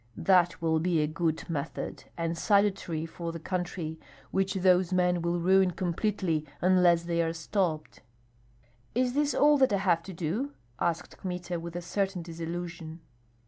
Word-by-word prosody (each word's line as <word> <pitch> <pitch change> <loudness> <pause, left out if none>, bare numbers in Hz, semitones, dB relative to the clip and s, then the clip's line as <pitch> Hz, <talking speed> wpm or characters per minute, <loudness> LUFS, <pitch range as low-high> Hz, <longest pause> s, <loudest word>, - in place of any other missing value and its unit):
That 180 -3 +3
will 160 -1 +2
be 170 0 +1
a 150 - +3
good 160 +3 -2
method, 150 -5 -4
and 165 0 -1
salutary 195 -4 +1
for 165 +1 -5
the 165 - -6
country, 175 -2 -4 0.3
which 195 0 0
those 185 -1 +3
men 180 -1 +2
will 170 +1 0
ruin 190 +2 +4
completely 180 -2 -1 0.2
unless 180 -2 +4
they 170 0 0
are 165 0 0
stopped." 165 -2 -2 0.9
"Is 250 0 +1
this 290 +1 +1
all 295 0 +5
that 265 -3 +4
I 200 - +3
have 180 -4 +2
to 190 +2 -9
do?" 185 - -2 0.3
asked 170 -1 -2
Kmita, 180 -2 -4
with 170 0 -7
a 175 - -4
certain 190 0 -1
disillusion. 165 0 -6
175 Hz, 155 wpm, -29 LUFS, 165-190 Hz, 0.9 s, all